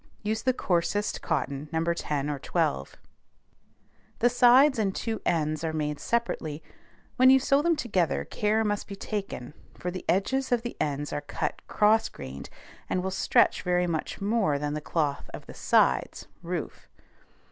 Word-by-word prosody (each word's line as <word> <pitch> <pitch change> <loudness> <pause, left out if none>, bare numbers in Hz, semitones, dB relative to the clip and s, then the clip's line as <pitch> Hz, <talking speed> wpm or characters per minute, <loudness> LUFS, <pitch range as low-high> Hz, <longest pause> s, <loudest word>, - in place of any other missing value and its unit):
Use 220 +1 -1
the 260 - +2
coarsest 205 -2 -1
cotton, 150 -2 -2
No. 160 0 0
10 145 -4 -2
or 145 -2 -3
12. 70 - -1 1.2
The 240 +1 +3
sides 250 +2 +6
and 195 -3 0
two 225 -1 -3
ends 155 -2 0
are 160 -1 -1
made 150 -2 -2
separately; 165 -10 -2 0.5
when 255 0 +7
you 265 0 +7
sew 275 +2 +3
them 335 +1 +2
together 190 - 0
care 215 +1 0
must 205 -1 -2
be 200 - -7
taken, 195 - -5 0.2
for 180 - -4
the 185 - -6
edges 260 +9 +1
of 240 -2 +2
the 240 - -5
ends 145 0 -2
are 145 - -2
cut 145 - -4
cross 220 +1 +3
grained, 65 0 -9 0.4
and 180 - 0
will 190 - -2
stretch 190 - +3
very 180 0 +1
much 165 -3 -3
more 200 -7 +1
than 145 +1 -2
the 150 - -3
cloth 150 -2 -2
of - - -10
the - - -10
sides - - +2 0.2
(roof). - - -5
185 Hz, 165 wpm, -27 LUFS, 150-225 Hz, 1.2 s, when